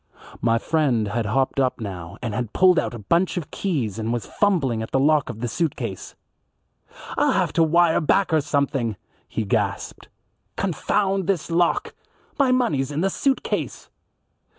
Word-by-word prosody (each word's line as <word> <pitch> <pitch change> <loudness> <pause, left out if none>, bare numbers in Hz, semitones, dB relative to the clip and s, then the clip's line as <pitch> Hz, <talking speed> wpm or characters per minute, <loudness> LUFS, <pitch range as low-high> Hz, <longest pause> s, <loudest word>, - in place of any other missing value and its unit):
My 115 -1 +3
friend 125 -6 +1
had 115 0 -1
hopped 130 +5 0
up 130 -1 +1
now 90 -6 -7
and 115 -3 -2
had 115 0 -3
pulled 180 -2 +5
out - - -3
a 105 -4 -10
bunch 175 - +1
of 165 -6 -5
keys 130 - -2
and 110 +1 -2
was 120 -1 -2
fumbling 145 - +1
at 110 - -5
the 135 - +1
lock 150 0 +3
of 110 - -7
the 120 - -1
suit 160 +4 -1
case. 115 -7 -6 1.0
"I'll - - +3
have - - 0
to 165 - +4
wire 170 +1 +3
back 180 +3 +2
or 155 - +4
something," 140 -6 0 0.3
he 110 - -2
gasped. 95 - -2 0.5
"Confound 195 +2 0
this 180 -4 -1
lock 410 - +1 0.5
my 270 -2 +4
money's 160 - +1
in 150 +2 -2
the 195 +1 +1
suit 270 +5 0
case." - - -4
145 Hz, 175 wpm, -23 LUFS, 115-175 Hz, 1.0 s, pulled